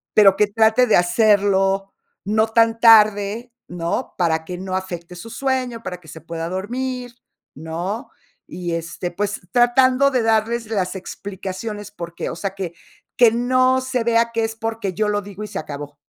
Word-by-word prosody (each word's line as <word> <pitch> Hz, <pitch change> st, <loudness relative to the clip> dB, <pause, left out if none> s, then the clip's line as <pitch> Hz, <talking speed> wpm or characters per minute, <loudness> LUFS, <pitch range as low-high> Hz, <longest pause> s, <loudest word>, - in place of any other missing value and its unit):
Pero 195 Hz, -2 st, +7 dB
que 210 Hz, -, +4 dB
trate 220 Hz, +4 st, +3 dB
de 220 Hz, -, +5 dB
hacerlo, 195 Hz, +1 st, +2 dB, 0.3 s
no 215 Hz, +2 st, +2 dB
tan 225 Hz, 0 st, +3 dB
tarde, 220 Hz, +1 st, +5 dB
¿no?, 170 Hz, -1 st, -3 dB
para 160 Hz, -3 st, +1 dB
que 180 Hz, +1 st, -6 dB
no 185 Hz, 0 st, -4 dB
afecte 180 Hz, -2 st, -5 dB
su 200 Hz, +6 st, -9 dB
sueño, 255 Hz, -2 st, -2 dB
para 180 Hz, -5 st, -6 dB
que 160 Hz, -, -18 dB
se 160 Hz, -, -10 dB
pueda 165 Hz, +1 st, -5 dB
dormir, 245 Hz, +6 st, -4 dB, 0.4 s
¿no? 170 Hz, -, -5 dB, 0.4 s
Y 175 Hz, -1 st, -5 dB
este, 170 Hz, +1 st, -4 dB
pues, 205 Hz, +3 st, -3 dB
tratando 255 Hz, +3 st, +4 dB
de 250 Hz, -3 st, +1 dB
darles 225 Hz, +1 st, +1 dB
las 190 Hz, -3 st, -1 dB
explicaciones 200 Hz, +2 st, -6 dB
porque, 170 Hz, -4 st, -6 dB
o -, -, -6 dB
sea, 195 Hz, -1 st, -4 dB
que 185 Hz, -4 st, -5 dB, 0.4 s
que 240 Hz, -2 st, +6 dB
no 255 Hz, +2 st, +2 dB
se 255 Hz, -2 st, -2 dB
vea 230 Hz, 0 st, +2 dB
que 225 Hz, -1 st, +1 dB
es 225 Hz, 0 st, -5 dB
porque 225 Hz, -3 st, -3 dB
yo 210 Hz, +2 st, 0 dB
lo 205 Hz, 0 st, 0 dB
digo 200 Hz, +1 st, -9 dB
y -, -, -5 dB
se -, -, -5 dB
acabó. 145 Hz, -1 st, -7 dB
210 Hz, 170 wpm, -21 LUFS, 180-230 Hz, 0.4 s, Pero